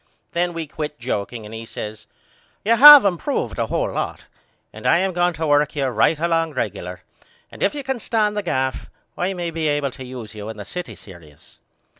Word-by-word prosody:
Then 175 Hz, 0 st, -1 dB
we 165 Hz, -1 st, -4 dB
quit 150 Hz, 0 st, -6 dB
jokeing 105 Hz, +2 st, -4 dB
and 105 Hz, -, -10 dB
he 115 Hz, 0 st, -6 dB
says 110 Hz, -1 st, -8 dB, 0.6 s
You 230 Hz, +2 st, +4 dB
have 290 Hz, +1 st, +11 dB
improved 200 Hz, -, -1 dB
a -, -, 0 dB
hole -, -, -1 dB
lot -, -, -4 dB, 0.5 s
and -, -, -5 dB
I -, -, +5 dB
am 190 Hz, +1 st, 0 dB
going 175 Hz, 0 st, +1 dB
to 160 Hz, +1 st, -3 dB
work 145 Hz, 0 st, +2 dB
you 140 Hz, -2 st, 0 dB
right 130 Hz, +5 st, +2 dB
along 165 Hz, -1 st, 0 dB
regular 90 Hz, -6 st, -4 dB, 0.5 s
and -, -, -13 dB
if 200 Hz, -, +1 dB
you 285 Hz, -, -5 dB
can 265 Hz, -2 st, -3 dB
stand 215 Hz, -2 st, 0 dB
the 210 Hz, -, -1 dB
gaff 130 Hz, -8 st, -2 dB, 0.3 s
I 185 Hz, +2 st, -2 dB
may 175 Hz, -1 st, -3 dB
be 160 Hz, -1 st, -2 dB
able 145 Hz, -2 st, 0 dB
to 130 Hz, -, -10 dB
use 125 Hz, -4 st, -8 dB
you 105 Hz, 0 st, -7 dB
in 110 Hz, -, -8 dB
the 105 Hz, -, -8 dB
city 180 Hz, -1 st, -7 dB
serious. 80 Hz, -5 st, -16 dB
155 Hz, 205 wpm, -21 LUFS, 115-180 Hz, 0.6 s, have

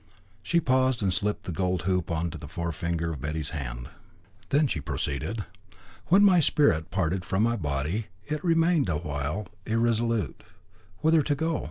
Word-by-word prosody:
She 170 Hz, +10 st, +2 dB
paused, 130 Hz, -5 st, +2 dB
and 95 Hz, -2 st, +2 dB
slipped 105 Hz, +2 st, -1 dB
the -, -, -5 dB
gold 90 Hz, +1 st, -1 dB
hoop 90 Hz, -2 st, 0 dB
on 85 Hz, 0 st, -1 dB
to 85 Hz, -, -6 dB
the 75 Hz, -, -8 dB
forefinger 85 Hz, +1 st, -2 dB
of 70 Hz, -, -8 dB
Betty's 75 Hz, +1 st, -3 dB
hand. -, -, -5 dB, 0.6 s
Then 150 Hz, +2 st, +4 dB
she 90 Hz, -, -1 dB
proceeded 75 Hz, -, -3 dB, 0.6 s
"When 195 Hz, +4 st, +6 dB
my 190 Hz, -3 st, +6 dB
spirit 115 Hz, -, +3 dB
parted 90 Hz, -1 st, 0 dB
from 95 Hz, +5 st, 0 dB
my 115 Hz, +1 st, +2 dB
body, 75 Hz, +4 st, -2 dB, 0.2 s
it 150 Hz, 0 st, -3 dB
remained 165 Hz, -, +3 dB
a 80 Hz, -, +1 dB
while 75 Hz, +5 st, -3 dB, 0.2 s
irresolute 115 Hz, -, 0 dB, 0.6 s
whither 160 Hz, 0 st, +5 dB
to 145 Hz, 0 st, 0 dB
go. 160 Hz, +2 st, 0 dB
95 Hz, 165 wpm, -27 LUFS, 80-130 Hz, 0.6 s, When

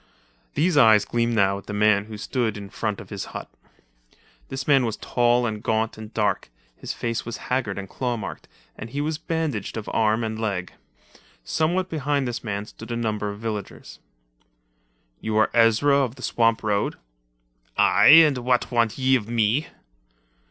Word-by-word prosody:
These 160 Hz, +2 st, +2 dB
eyes 110 Hz, -5 st, +6 dB
gleamed 120 Hz, 0 st, 0 dB
now 100 Hz, -2 st, +2 dB
at -, -, -17 dB
the 105 Hz, -, -5 dB
man 105 Hz, -1 st, +3 dB
who 110 Hz, -1 st, -8 dB
stood 110 Hz, 0 st, -2 dB
in 100 Hz, 0 st, -9 dB
front 105 Hz, -3 st, -3 dB
of -, -, -12 dB
his 100 Hz, -2 st, -4 dB
hut. -, -, -8 dB, 1.0 s
This 135 Hz, 0 st, -5 dB
man 135 Hz, -3 st, +5 dB
was 115 Hz, -3 st, -2 dB
tall 120 Hz, 0 st, +2 dB
and 110 Hz, -2 st, -3 dB
gaunt 110 Hz, +1 st, 0 dB
and 110 Hz, 0 st, -10 dB
dark, 105 Hz, -, -1 dB, 0.3 s
his -, -, -6 dB
face 115 Hz, -1 st, -3 dB
was 115 Hz, -, -6 dB
haggard 125 Hz, -6 st, 0 dB
and 100 Hz, -1 st, -5 dB
claw 125 Hz, +3 st, -3 dB
marked, 100 Hz, -3 st, -7 dB, 0.3 s
and 110 Hz, -, -8 dB
he 140 Hz, +4 st, -4 dB
was 150 Hz, +1 st, -2 dB
bandaged 155 Hz, -, -3 dB
of 110 Hz, -, -6 dB
arm 110 Hz, +1 st, +2 dB
and 110 Hz, 0 st, -3 dB
leg. 100 Hz, -5 st, -3 dB, 0.7 s
Somewhat 175 Hz, -, 0 dB
behind 145 Hz, -5 st, -1 dB
this 120 Hz, -1 st, -4 dB
man 100 Hz, -2 st, -3 dB
stood 110 Hz, +2 st, -12 dB
a -, -, -1 dB
number 105 Hz, -3 st, -2 dB
of 100 Hz, +1 st, -8 dB
villagers. 110 Hz, -3 st, -6 dB, 1.2 s
"You 110 Hz, -1 st, -2 dB
are 110 Hz, -, +3 dB
Ezra 115 Hz, +5 st, +4 dB
of 130 Hz, -3 st, 0 dB
the 125 Hz, -, -12 dB
swamp 115 Hz, -1 st, +1 dB
road?" 105 Hz, -1 st, 0 dB, 0.8 s
"Aye, -, -, +5 dB, 0.2 s
and 140 Hz, -4 st, 0 dB
what 125 Hz, +1 st, 0 dB
want 115 Hz, -2 st, +1 dB
ye 130 Hz, 0 st, +3 dB
of 115 Hz, -3 st, -2 dB
me?" 120 Hz, +5 st, +1 dB
115 Hz, 175 wpm, -24 LUFS, 105-130 Hz, 1.2 s, eyes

